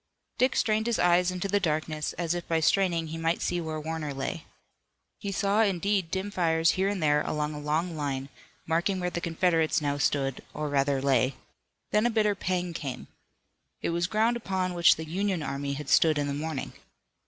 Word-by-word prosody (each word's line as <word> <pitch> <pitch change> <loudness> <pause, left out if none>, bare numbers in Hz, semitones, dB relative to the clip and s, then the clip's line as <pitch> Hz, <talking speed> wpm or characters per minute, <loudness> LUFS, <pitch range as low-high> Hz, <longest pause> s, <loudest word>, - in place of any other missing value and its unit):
Dick 255 +1 +3
strained 220 +1 +1
his 235 - +1
eyes 175 +1 +4
into 185 +1 -2
the 205 +1 +2
darkness, 155 -2 -1
as 170 -1 -1
if 175 -1 -5
by 165 -1 +1
straining 170 -1 +2
he 165 +1 -5
might 165 +1 0
see 175 -1 -1
where 160 -1 -4
Warner 155 -2 -4
lay. 135 +4 -4 0.7
He 200 - -4
saw, 200 +2 +2
indeed, 195 -2 +1
dim 190 +3 -3
fires 165 -3 +2
here 190 +1 +1
and 200 -5 -2
there 150 -1 +3
along 150 0 -2
a 150 - -6
long 160 +4 -1
line, 140 -2 -3 0.4
marking 175 +4 0
where 180 0 -2
the 170 - -3
Confederates 165 -1 +2
now 145 -1 -1
stood, 135 -2 0
or 150 0 -2
rather 140 -1 +1
lay. 130 -1 +2 0.6
Then 210 +3 +3
a - - +1
bitter 215 -2 +2
pang 180 -2 -2
came. 140 -5 -6 0.7
It - - 0
was 170 +1 0
ground 220 +4 +2
upon 190 -5 -2
which 170 -1 +6
the 160 - -6
Union 185 +1 -1
army 140 0 -3
had 145 0 -6
stood 155 0 +4
in 145 - 0
the 140 - -2
morning. 150 -1 -4
165 Hz, 195 wpm, -28 LUFS, 150-190 Hz, 0.7 s, which